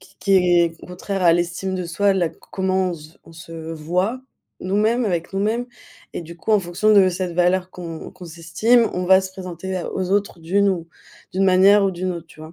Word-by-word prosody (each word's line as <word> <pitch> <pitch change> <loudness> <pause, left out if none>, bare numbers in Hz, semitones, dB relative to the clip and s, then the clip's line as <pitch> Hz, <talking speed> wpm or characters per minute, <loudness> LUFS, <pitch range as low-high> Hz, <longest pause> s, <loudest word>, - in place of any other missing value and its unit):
Qui - - -20
qui 195 -1 +3
est 175 -2 +3
contraire 185 +2 -4
à 170 -2 +6
l'estime 175 +2 -1
de 180 -1 -3
soi 195 +4 +1
là 175 -4 +1
c - - -16 0.2
comment 190 -1 0
on - - -4
se 155 -2 -12
v - - -28
on 165 - -16
se 165 0 -9
voit 180 +10 -2 0.4
nous-mêmes 215 +6 +1
avec 175 -3 -2
nous-mêmes. 215 +5 -1 0.5
Et - - -4
du 170 0 -10
coup 175 - -5
en 210 - +5
fonction 180 +5 +1
de 195 -2 +6
cette 180 -1 -3
valeur 180 +1 +1
qu'on 165 -3 -8
qu'on 185 -2 -13
s'estime 185 +9 +2
on 180 0 -2
va 190 0 +6
se 190 - -6
présenter 185 0 -6
à 175 - -4
aux 185 -1 -3
autres 200 -3 0
d'une 200 +5 +2
ou 170 -3 -2 0.4
d'une 190 +1 +1
manière 195 +2 +5
ou 195 - +2
d'une 180 +1 -3
autre, 170 -1 -8
tu 155 - -18
vois? 155 +1 -10
185 Hz, 225 wpm, -21 LUFS, 170-195 Hz, 0.5 s, à